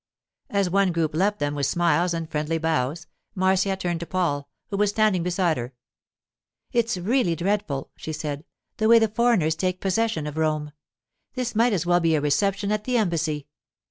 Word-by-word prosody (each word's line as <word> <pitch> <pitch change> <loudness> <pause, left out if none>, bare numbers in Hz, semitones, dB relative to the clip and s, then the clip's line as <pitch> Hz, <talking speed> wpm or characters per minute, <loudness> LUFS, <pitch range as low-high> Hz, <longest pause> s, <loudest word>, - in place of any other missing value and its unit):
As 200 -2 +1
one 195 +1 +2
group 165 -2 -1
left 200 +6 +1
them 145 0 -1
with 140 -2 0
smiles 170 +2 +2
and 165 -1 -3
friendly 155 +1 -1
bows, 160 0 -1 0.3
Marcia 190 +1 +2
turned 175 -3 -2
to 170 - -6
Paul, 145 -6 -1 0.2
who 200 - -1
was 205 0 +3
standing 210 -3 +2
beside 175 -2 +1
her. 125 +1 -6 1.0
'It's 235 -3 +1
really 185 -1 +1
dreadful,' 175 -6 -2
she 155 - -6
said, 150 -2 -4 0.3
'the 220 - +1
way 230 +1 +8
the 225 -1 +4
foreigners 215 -8 +2
take 185 +2 -2
possession 200 -3 0
of 150 0 -6
Rome. 155 -1 0 0.6
This 250 -2 -2
might 230 +2 +3
as 180 -4 0
well 175 0 +4
be 165 -2 +2
a - - +2
reception 195 +8 0
at 210 0 -1
the 250 -1 +1
Embassy. 165 -8 0
175 Hz, 180 wpm, -24 LUFS, 155-205 Hz, 1.0 s, way